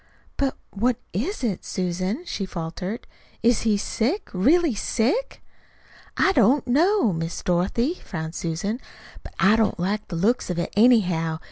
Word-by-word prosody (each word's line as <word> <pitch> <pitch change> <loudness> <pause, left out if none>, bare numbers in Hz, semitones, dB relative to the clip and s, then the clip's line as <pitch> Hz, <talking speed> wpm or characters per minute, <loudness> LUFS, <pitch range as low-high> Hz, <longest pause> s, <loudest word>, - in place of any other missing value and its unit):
"But 275 -2 -1
what 235 +4 +1 0.2
IS 270 - -2
it, 210 -7 -1
Susan?" 185 - -2
she 195 - -4
faltered. 180 +6 -5 0.4
"Is 235 0 +4
he 215 -2 +2
sick, 250 - -1
really 295 - +3
sick?" 260 - -1 0.7
"I 390 - +4
don't 255 - +3
know, 310 - +3
Miss 165 0 -4
Dorothy," 205 - 0
frowned 160 -2 -5
Susan. 175 +9 -3 0.4
"But - - -12
I 200 +3 +5
don't 220 -5 +1
like 205 +4 -1
the 170 - -5
looks 210 +8 +1
of 180 - -2
it, 175 - -2
anyhow. 180 -9 +3
215 Hz, 145 wpm, -24 LUFS, 180-255 Hz, 0.7 s, I